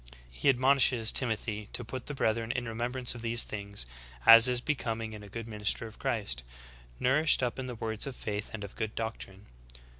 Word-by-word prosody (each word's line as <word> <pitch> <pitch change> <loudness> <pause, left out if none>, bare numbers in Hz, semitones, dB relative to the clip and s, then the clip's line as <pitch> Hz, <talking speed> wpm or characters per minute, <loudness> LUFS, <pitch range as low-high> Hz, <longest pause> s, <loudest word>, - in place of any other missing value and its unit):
He - - 0
admonishes 130 -3 +3
Timothy 110 -4 0
to 120 - -2
put 125 +2 -8
the 145 - -5
brethren 115 -2 -1
in 125 -1 -4
remembrance 120 +2 -1
of 120 - -9
these 115 0 +2
things, 100 - -4 0.4
as 115 +1 +10
is 125 -1 +1
becoming 115 -5 -3
in 105 - -9
a 105 - -12
good 115 +2 -7
minister 105 +1 0
of 110 -1 -12
Christ, 100 - -2 0.6
''nourished 140 +2 +4
up 125 +1 -2
in 130 - -5
the 125 - -6
words 110 +1 -2
of 135 - -6
faith 105 -2 -5
and 110 -2 -7
of 100 - -10
good 110 0 -4
doctrine." 105 -3 -6
115 Hz, 190 wpm, -29 LUFS, 105-125 Hz, 0.6 s, as